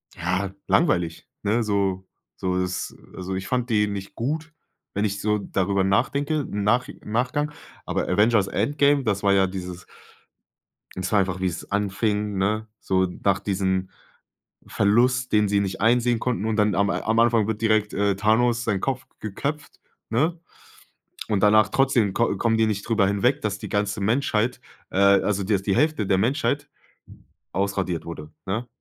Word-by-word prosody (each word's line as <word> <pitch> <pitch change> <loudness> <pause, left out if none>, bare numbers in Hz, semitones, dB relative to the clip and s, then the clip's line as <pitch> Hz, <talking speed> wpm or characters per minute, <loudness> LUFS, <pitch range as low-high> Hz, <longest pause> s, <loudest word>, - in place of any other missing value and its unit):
ja, 90 +3 -2
langweilig, 85 - +1 0.2
ne? 110 +4 +1
So 100 -3 -1 0.3
so 90 0 -1
das, 90 0 -3 0.2
also 95 +1 -4
ich 95 0 -4
fand 125 -1 -1
die 105 -1 +3
nicht 100 -1 -6
gut, 155 +6 -3 0.4
wenn 100 +2 0
ich 100 -1 -2
so 105 0 +1
darüber 100 0 0
nachdenke, 140 +10 +1
im 105 -7 -4
Nachi 120 +5 0
Nachgang. 125 +7 -1 0.3
Aber - - -2
Avengers 105 +1 +3
Endgame, 145 +5 +2
das 100 -4 -1
war 100 0 +4
ja 95 -1 +4
dieses 90 -1 -7 1.1
das 95 0 -3
war 105 - +4
einfach, 95 -1 -1
wie 95 - 0
es 85 -2 -6
anfing, 105 0 -1
ne, 105 +3 0
so 95 0 +1 0.2
nach 100 -2 +2
diesem 95 -2 -1 0.8
Verlust, 125 +5 +2
den 105 -1 +3
sie 100 0 +2
nicht 95 -1 -3
einsehen 120 +2 +3
konnten, 120 -5 -1
und 110 -1 0
dann 105 -2 +2
am 100 0 +2
am 110 +3 0
Anfang 115 -2 +4
wird 110 -1 -3
direkt, 110 -2 +2
äh, 100 0 +2
Thanos 115 +3 +2
seinen 105 -5 0
Kopf 130 +2 -2
geköpft, 140 +8 -5 0.3
ne? 155 +10 +1 0.9
Und 105 -3 +1
danach 105 +1 +5
trotzdem 120 -7 +2
kom 115 -4 +1
kommen 115 +1 +2
die 110 0 +3
nicht 100 -2 -3
drüber 110 -4 +3
hinweg, 120 +8 +1
dass 105 -1 -2
die - - -7
ganze 105 0 -1
Menschheit 115 +2 0 0.3
äh, - - -6
also, 100 0 +3
dass 100 -1 +1
die 95 -1 0
Hälfte 155 -9 +1
der 95 -1 +2
Menschheit 145 +6 0 0.9
ausradiert 95 -3 -1
wurde, 80 -2 -8
ne? 110 +6 -3
105 Hz, 165 wpm, -24 LUFS, 95-120 Hz, 1.1 s, danach